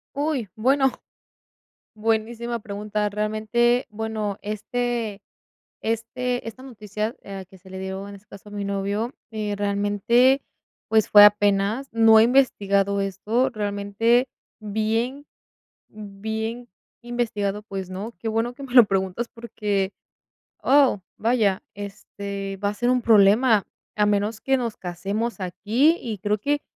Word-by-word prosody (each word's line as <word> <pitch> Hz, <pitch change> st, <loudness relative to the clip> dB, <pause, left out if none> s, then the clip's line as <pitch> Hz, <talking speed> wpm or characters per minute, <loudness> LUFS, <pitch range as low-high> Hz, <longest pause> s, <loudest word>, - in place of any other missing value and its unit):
Uy, 285 Hz, -5 st, -1 dB
bueno. 265 Hz, +4 st, +3 dB, 1.0 s
Buenísima 225 Hz, +2 st, -1 dB
pregunta. 210 Hz, 0 st, -3 dB
Realmente, 215 Hz, +4 st, +1 dB
bueno, 215 Hz, -2 st, -3 dB
este 225 Hz, 0 st, -3 dB, 0.6 s
este 230 Hz, +3 st, -2 dB
esta 255 Hz, +4 st, -10 dB
noticia, 215 Hz, -2 st, -4 dB
ah, 195 Hz, -1 st, -7 dB
que 190 Hz, -, -16 dB
se 190 Hz, +1 st, -17 dB
le 190 Hz, -, -7 dB
dio, 190 Hz, +1 st, -5 dB
en 200 Hz, -, -9 dB
ese 200 Hz, +1 st, -20 dB
caso, 200 Hz, +1 st, -13 dB
a -, -, -13 dB
mi 205 Hz, -1 st, -4 dB
novio, 200 Hz, +5 st, -2 dB, 0.2 s
eh 215 Hz, -2 st, -3 dB
realmente, 205 Hz, +6 st, +2 dB, 0.5 s
pues, 220 Hz, -1 st, +3 dB
fue 205 Hz, -, +9 dB
apenas, 205 Hz, +4 st, +3 dB
no 225 Hz, -1 st, +6 dB
he 220 Hz, -, +7 dB
investigado 200 Hz, -6 st, +2 dB
esto, 210 Hz, +7 st, 0 dB
realmente, 210 Hz, +3 st, +1 dB, 0.3 s
bien 225 Hz, +6 st, -2 dB, 0.6 s
bien 220 Hz, +3 st, -5 dB, 0.3 s
investigado, 225 Hz, -4 st, -2 dB
pues, 195 Hz, -3 st, -6 dB
no. 200 Hz, +5 st, -5 dB
Qué -, -, -9 dB
bueno 225 Hz, +2 st, 0 dB
que 275 Hz, +3 st, -10 dB
me 255 Hz, -1 st, -9 dB
lo 245 Hz, -, +10 dB
preguntas, 195 Hz, +3 st, -1 dB
porque, 205 Hz, -4 st, -2 dB, 0.7 s
oh, 270 Hz, -7 st, +4 dB, 0.2 s
vaya, 220 Hz, -5 st, +1 dB
este, 200 Hz, -1 st, -6 dB
va 200 Hz, -, +2 dB
a -, -, -3 dB
ser 240 Hz, +4 st, +1 dB
un 250 Hz, -1 st, +2 dB
problema, 220 Hz, 0 st, +5 dB, 0.3 s
a 210 Hz, -, +3 dB
menos 210 Hz, +1 st, 0 dB
que 270 Hz, 0 st, +2 dB
nos 235 Hz, -4 st, -3 dB
casemos 200 Hz, +6 st, -3 dB
aquí, 215 Hz, -, +2 dB
y 220 Hz, -4 st, -5 dB
creo 210 Hz, +3 st, 0 dB
que, 290 Hz, +7 st, -1 dB
215 Hz, 135 wpm, -24 LUFS, 200-235 Hz, 1.0 s, lo